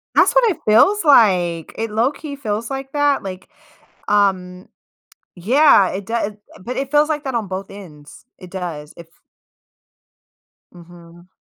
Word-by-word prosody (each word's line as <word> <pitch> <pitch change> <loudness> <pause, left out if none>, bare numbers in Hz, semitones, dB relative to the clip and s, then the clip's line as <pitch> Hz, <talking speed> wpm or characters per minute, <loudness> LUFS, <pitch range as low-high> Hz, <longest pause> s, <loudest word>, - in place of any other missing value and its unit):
That's - - +4
what - - +4
it 340 - -6
feels 310 - +4
like; 180 - +3
it 225 0 -3
low 230 +5 +1
key 295 -1 -9
feels 225 -4 -4
like 270 0 -6
that, 290 -3 +1
like, 185 -1 -8 0.6
um 190 -3 0 0.7
Yeah, 220 - +4
it 195 +1 -6
do 215 -1 -3 0.2
but 240 +7 -6
it 270 0 -4
feels 295 0 +3
like 300 -1 -2
that 265 -3 -4
on 225 -3 -2
both 190 +1 -6
ends; 155 -8 -14
it 185 - -13
does 165 -5 -7
if 170 - -12 1.7
Mhm. 175 0 -17
205 Hz, 145 wpm, -19 LUFS, 180-270 Hz, 1.7 s, That's